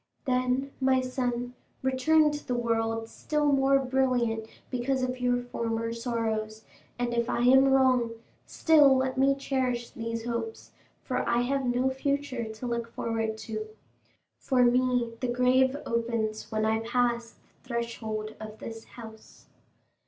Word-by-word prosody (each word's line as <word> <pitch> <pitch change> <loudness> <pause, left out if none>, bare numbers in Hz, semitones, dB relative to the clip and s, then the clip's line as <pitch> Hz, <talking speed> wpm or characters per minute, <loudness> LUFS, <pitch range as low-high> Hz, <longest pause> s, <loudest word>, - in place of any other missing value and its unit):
Then, 255 +1 0
my 260 0 +4
son, 245 -1 -2 0.3
return 300 +4 +3
to 295 0 -7
the 250 - 0
world 225 -1 -1
still 295 +4 0
more 275 0 +4
brilliant 250 -4 0 0.2
because 260 +1 0
of 255 0 -2
your 245 0 +2
former 230 -1 -2
sorrows; 225 -2 -3 0.3
and 240 0 -1
if 235 0 0
I - - 0
am 265 +2 +6
wrong, 260 -3 +4 0.4
still 295 -5 +5
let 260 0 0
me 270 +1 +3
cherish 255 -3 -2
these 230 0 -4
hopes, 240 - -4 0.3
for - - -2
I 235 0 +3
have 270 +1 -1
no 250 +2 +1
future 275 -2 -2
to 220 +3 -8
look 235 -1 -2
forward 225 -2 -2
to. 215 -1 -4 0.7
For 255 -3 +2
me 245 -1 +2
the 255 - -1
grave 255 +2 +3
opens 230 -2 -2
when 215 0 0
I 220 0 +2
pass 235 0 0 0.3
the - - -23
threshold 220 -2 -3
of 215 0 -8
this 225 0 -8
house." 220 -2 -13
245 Hz, 145 wpm, -28 LUFS, 230-260 Hz, 0.7 s, am